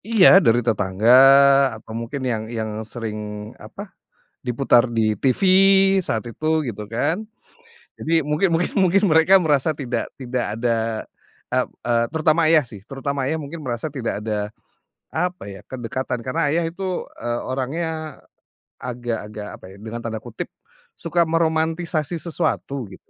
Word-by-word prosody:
Iya, 200 -3 +7
dari 120 0 +3
tetangga 105 -1 0 0.7
atau 110 0 -12
mungkin 115 +5 -5
yang 115 -4 -1
yang 110 -2 -4
sering, 105 -1 -6
apa, 190 - -10 0.5
diputar 125 -1 +3
di 110 -2 +1
TV 130 +5 +1 0.6
saat 115 -7 -2
itu, 155 +7 0
gitu 105 -3 -5
kan. 165 - -1 0.7
Jadi 165 +1 +1
mungkin 150 +5 0
mungkin 165 +2 0
mungkin 190 0 +3
mereka 165 +4 +5
merasa 155 -2 +2
tidak 135 -4 -4
tidak 125 -1 -2 0.2
ada 120 -1 +1 0.7
ep - - 0 0.2
eee, 115 -1 +3
terutama 160 0 +2
ayah 155 -3 +5
sih. 105 -4 -10
Terutama 135 +1 -3
ayah 160 +4 -1
mungkin 155 +2 -8
merasa 120 +3 -3
tidak 130 -7 -4
ada, 105 -1 -3 0.6
apa 180 - -3
ya, 100 -1 -11
kedekatan 125 0 -4
karena 130 +2 -1
ayah 170 - +2
itu, 185 +1 -4 0.2
eee, 120 0 -1
orangnya 155 +4 -4 0.6
agak-agak, 115 -4 -5
apa - - -15
ya, - - -15
dengan 115 +2 -7
tanda 110 -1 -4
kutip, 115 -1 -7 0.4
"suka 170 - 0
meromantisasi 160 0 -1
sesuatu 155 -6 -2
gitu." - - -17
130 Hz, 140 wpm, -22 LUFS, 115-160 Hz, 0.7 s, Iya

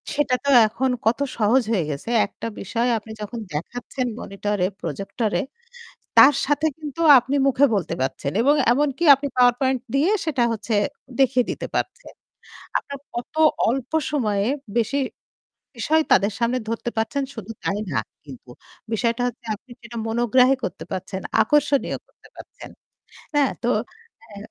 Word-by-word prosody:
সেটা 285 -3 +2
তো - - +1 0.2
এখন 255 +4 -1 0.2
কত 230 +5 +2 0.2
সহজ 230 +4 +3
হয়ে 190 -7 +2
গেছে। 145 +10 -5 0.2
একটা 230 - -7
বিষয় 230 +5 -1
আপনি 220 +1 -9
যখন 230 +3 -5
দেখাচ্ছেন 245 - -4
মনিটরে, 200 -1 -2 0.2
প্রজেক্টরে, 210 +4 -2 0.8
তার 280 +1 +9
সাথে 290 +2 +1
কিন্তু 305 +1 -7 0.2
আপনি 265 +4 -1
মুখে 275 +1 +4
বলতে 195 - -1
পারছেন। 135 +1 -2
এবং 285 +3 +4 0.2
এমনকি 290 +4 0
আপনি 280 +2 -4
পাওয়ার 245 -1 +5
পয়েন্ট 260 -2 +1
দিয়ে 305 +8 +3
সেটা 285 -6 0
হচ্ছে 220 0 -3 0.5
দেখিয়ে 255 -2 +4
দিতে - - -4
পারছেন। - - -3 0.7
আপনার 280 -1 -8 0.2
কত 240 +5 -6 0.3
অল্প 255 +1 -2 0.2
সময়ে 210 -8 0 0.3
বেশি 245 +5 0 0.8
বিষয় 315 +8 +2
তাদের 200 +2 +4
সামনে 240 +2 +1
ধরতে 230 +1 -3
পারছেন 225 +6 -1
শুধু 225 -1 -8
তাই 200 - 0
না 130 - +1 0.3
কিন্তু। 130 -3 -12 0.4
বিষয়টা 235 +2 0
হচ্ছে 240 -1 -11
আপনি 255 - -30
সেটা 235 0 -10
মনোগ্রাহ 240 +2 +3 0.2
করতে 180 +1 -5
পারছেন। 190 +1 -4 0.2
আকর্ষণীয় 290 -2 +1
করতে - - -22
পারছেন। - - -12 0.6
হ্যাঁ? 285 -2 +3
তো 240 - 0 0.7
এ - - -11
240 Hz, 145 wpm, -23 LUFS, 210-275 Hz, 0.8 s, তার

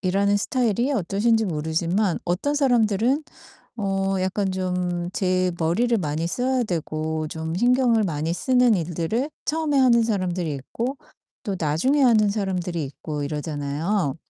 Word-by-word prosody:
일하는 200 +2 +2
스타일이 240 +3 0
어떠신지 220 +1 +1
모르지만 170 +3 0
어떤 180 +12 0
사람들은 245 0 +2 0.5
어 195 -1 0
약간 190 +1 -1
좀 180 -1 -2
제 185 -1 +1
머리를 225 +9 +2
많이 155 -1 -2
써야 255 +4 0
되고 160 -4 -2
좀 160 +1 -4
신경을 240 -1 +3
많이 160 -2 -2
쓰는 250 +4 +3
일들을 175 - -2
처음에 310 -1 0
하는 240 -3 +5
사람들이 185 -7 -1
있고 235 - -4 0.5
또 200 -4 -3
나중에 175 - +1
하는 215 -5 +4
사람들이 180 -6 -2
있고 145 +2 -5
이러잖아요. 150 +3 -2
190 Hz, 310 characters per minute, -23 LUFS, 165-235 Hz, 0.5 s, 하는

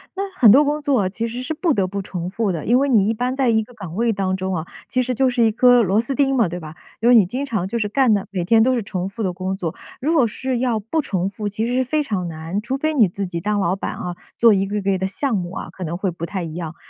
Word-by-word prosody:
那 395 - -2 0.2
很 230 -5 +8
多 275 +7 +7
工 295 +1 -1
作 255 -10 +1
其 230 +4 -3
实 240 +2 -5
是 285 +5 -3
不 320 0 +1
得 195 -4 +1
不 200 +1 -4
重 180 -2 -5
复 205 +1 -1
的， 165 -4 -4
因 240 +3 +4
为 280 +1 +1
你 210 -5 +4
一 225 - +2
般 250 +3 -2
在 265 -3 +2
一 220 -1 +2
个 245 - -16
岗 190 -6 -8
位 230 0 +1
当 190 -1 -1
中 190 0 -2
哦， 160 +1 -4 0.2
其 255 - 0
实 250 0 -2
就 265 +2 +3
是 245 -1 +1
一 225 - +4
颗 245 +2 +5
螺 200 +1 +2
丝 235 +4 -1
钉 270 0 +2
嘛， 230 -6 +3
对 175 +1 -5
吧？ 155 -1 -10 0.2
因 235 +2 +3
为 245 - +7
你 215 -5 +7
经 250 +10 -3
常 210 -8 -2
就 235 +4 -2
是 210 - 0
干 250 0 +3
的， 200 -2 -1
每 185 -3 -2
天 225 +3 +4
都 255 +3 +3
是 235 - -1
重 190 -1 -4
复 215 +2 -5
的 185 - -1
工 185 +1 -3
作， 170 -5 -3 0.3
如 310 +6 0
果 260 -8 +4
是 255 +3 -3
要 240 -3 0
不 230 +10 -1
重 190 -8 -2
复， 205 +1 -4
其 215 +3 -2
实 240 - -2
是 260 +1 +2
非 300 +4 0
常 190 -9 -2
难， 165 +5 -4
除 260 +4 -3
非 310 +2 0
你 235 -9 +5
自 195 +3 -4
己 170 -2 -4
当 210 +1 0
老 185 -1 +1
板 - - -4
哦， 180 -1 -5 0.2
做 230 -2 +6
一 195 0 +1
个 205 +1 -2
个 195 -1 +1
的 190 - -1
项 240 +4 -1
目 175 -2 -3
啊， - - -6
可 185 +1 -8
能 170 +1 -3
会 190 -1 -1
不 170 0 -5
太 190 0 -4
一 160 -2 -6
样。 170 -1 -6
210 Hz, 335 characters per minute, -21 LUFS, 185-250 Hz, 0.3 s, 很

